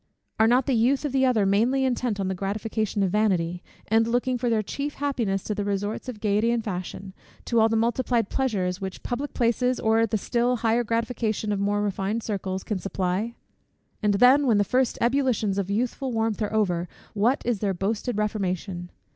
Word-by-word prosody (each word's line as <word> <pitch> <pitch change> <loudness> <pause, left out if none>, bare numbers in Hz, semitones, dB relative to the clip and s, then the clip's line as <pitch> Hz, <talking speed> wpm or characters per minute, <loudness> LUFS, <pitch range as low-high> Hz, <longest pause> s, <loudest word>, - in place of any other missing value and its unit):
Are 220 - +6
not 245 +2 +3
the 270 - +1
youth 250 +5 +2
of 290 - -1
the 265 0 +3
other 220 -5 +2
mainly 235 +7 +2
intent 245 -4 -1
on 195 - -1
the 190 - -1
gratification 205 +2 -2
of 190 - +1
vanity; 180 -5 +1 0.3
and 225 +1 +3
looking 245 +2 +1
for 245 0 -1
their 220 -2 +1
chief 285 +7 -4
happiness 235 -9 -1
to 210 - -2
the 205 0 -2
resorts 205 +4 -2
of 230 -4 -7
gaiety 210 +2 +1
and 235 -1 0
fashion, 190 -1 -5 0.3
to 235 - +2
all 220 0 +5
the 225 - 0
multiplied 235 0 +1
pleasures 195 -9 -1
which 190 -1 -6
public 270 +4 -4
places, 250 +1 +1
or 225 +1 +3
the 215 - 0
still 240 +4 +1
higher 230 0 +1
gratifications 225 -2 -1
of 200 - -2
more 205 +1 +1
refined 205 +2 -2
circles, 190 -3 -3
can 210 -4 -3
supply? 195 +4 -2 0.7
And 210 -2 +2
then, 260 +6 +5
when 225 -4 +4
the 205 - +4
first 255 +3 +1
ebullitions 235 -6 +1
of 195 -1 -2
youthful 250 +5 -1
warmth 225 -1 -1
are 210 - -1
over, 180 -5 0 0.3
what 230 +7 +1
is 235 -4 0
their 195 -2 0
boasted 210 +5 -2
reformation? 190 -4 -2
220 Hz, 195 wpm, -25 LUFS, 200-240 Hz, 0.7 s, Are